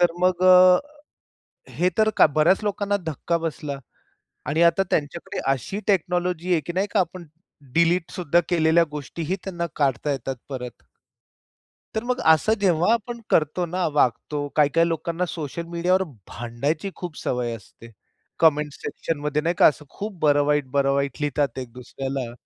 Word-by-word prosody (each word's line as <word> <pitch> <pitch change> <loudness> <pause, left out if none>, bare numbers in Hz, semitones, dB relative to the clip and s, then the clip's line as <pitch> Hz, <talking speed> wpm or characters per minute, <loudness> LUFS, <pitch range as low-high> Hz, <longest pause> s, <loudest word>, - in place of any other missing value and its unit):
तर 175 -1 +4
मग 185 0 +2
अ, 185 0 +8 0.9
हे 180 +1 +1
तर 215 0 +4 0.2
बऱ्याच 170 +7 +3
लोकांना 205 0 0
धक्का 160 +2 -1
बसला 150 -3 -4 0.7
आणि 155 +3 0
आता 170 +3 +4
त्यांच्याकडे 155 +3 -2
अशी 135 - -3
टेक्नॉलॉजी 180 -1 0
आहे, 160 - +2
की 175 - -6
नाही 195 +3 0
का 210 - +2
आपण 180 0 -2 0.5
डिलीटसुद्धा 170 0 +2
केलेल्या 165 0 +4
गोष्टीही 155 +4 -4
त्यांना 170 -3 -3
काढता 140 0 0
येतात 135 -1 -3
परत. 125 -2 -5 1.2
तर 220 - -1
मग 250 +1 -1
असं 160 +7 +4
जेव्हा 180 +1 +3
आपण 235 +1 -2
करतो 155 +3 +2
ना 180 +1 -1
वागतो, 145 +1 0
काही-काही 160 +3 +3
लोकांना 170 +2 -2
सोशल 160 0 -5
मीडियावर 180 +2 +1 0.3
भांडायची 140 +10 -3
खूप 175 -4 -7
सवय 125 -2 -2
असते. 115 +2 -14 0.5
कमेंट्स 150 -2 +3
सेक्शनमध्ये 150 -1 -2
नाही 170 +2 0
का - - +7
असं 150 0 +2
खूप 205 -2 -7
बरं 145 -1 +4
वाईट, 145 -2 +1
बरं 140 0 +2
वाईट 140 -1 -1
लिहितात 145 -3 -1
एक 125 -3 -7
दुसऱ्याला. 130 0 -5
165 Hz, 145 wpm, -23 LUFS, 145-180 Hz, 1.2 s, अ